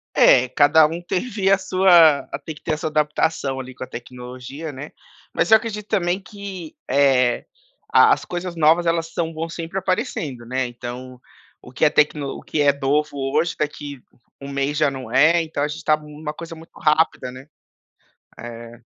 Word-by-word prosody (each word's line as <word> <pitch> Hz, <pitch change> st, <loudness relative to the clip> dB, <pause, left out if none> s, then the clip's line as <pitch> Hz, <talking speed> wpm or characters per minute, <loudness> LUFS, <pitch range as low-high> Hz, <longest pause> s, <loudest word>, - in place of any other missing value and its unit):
É, 125 Hz, 0 st, +6 dB
cada 145 Hz, +4 st, +5 dB
um 165 Hz, +3 st, -5 dB
teve 195 Hz, +2 st, -1 dB
a 195 Hz, -, +6 dB
sua 175 Hz, -6 st, +4 dB, 0.2 s
tem 160 Hz, -, -6 dB
que -, -, -17 dB
ter 155 Hz, -, -2 dB
essa 155 Hz, -, -5 dB
adaptação 150 Hz, -2 st, 0 dB
ali 130 Hz, 0 st, -8 dB
com -, -, -11 dB
a -, -, -11 dB
tecnologia, 125 Hz, +5 st, -8 dB
né. 145 Hz, +2 st, -9 dB, 0.4 s
Mas -, -, 0 dB
eu 220 Hz, -, +9 dB
acredito 215 Hz, -2 st, -4 dB
também 175 Hz, +1 st, 0 dB
que, 195 Hz, -4 st, -9 dB
eh, 130 Hz, -3 st, +2 dB, 0.4 s
a -, -, +6 dB
as -, -, 0 dB
coisas 175 Hz, 0 st, -5 dB
novas 165 Hz, +1 st, +3 dB
elas 165 Hz, -1 st, 0 dB
são 165 Hz, -2 st, -2 dB
bom 165 Hz, +1 st, -4 dB
sempre 165 Hz, +2 st, -5 dB
aparecendo, 160 Hz, -9 st, -3 dB
né. 130 Hz, +2 st, -2 dB
Então, 125 Hz, +1 st, -8 dB, 0.4 s
o -, -, -13 dB
que -, -, -10 dB
é -, -, +7 dB
tecno 150 Hz, -1 st, +1 dB
o -, -, -10 dB
que 155 Hz, -, -3 dB
é 145 Hz, -1 st, +5 dB
novo 145 Hz, +2 st, 0 dB, 0.2 s
hoje 170 Hz, -, +1 dB
daqui 145 Hz, -3 st, -4 dB, 0.4 s
um 140 Hz, -, -8 dB
mês 140 Hz, +1 st, -1 dB
já 150 Hz, -1 st, +2 dB
não 130 Hz, -4 st, -8 dB
é, 155 Hz, +7 st, +4 dB
então 155 Hz, -3 st, -4 dB
a 145 Hz, -, 0 dB
gente 150 Hz, -, -7 dB
tá 155 Hz, -, +4 dB
numa 150 Hz, 0 st, -8 dB
coisa 170 Hz, +1 st, -8 dB
muito 165 Hz, 0 st, -15 dB
rápida, 150 Hz, -4 st, +1 dB
né 130 Hz, +2 st, -12 dB, 0.9 s
eh. 115 Hz, 0 st, -10 dB
150 Hz, 185 wpm, -21 LUFS, 130-170 Hz, 0.9 s, eu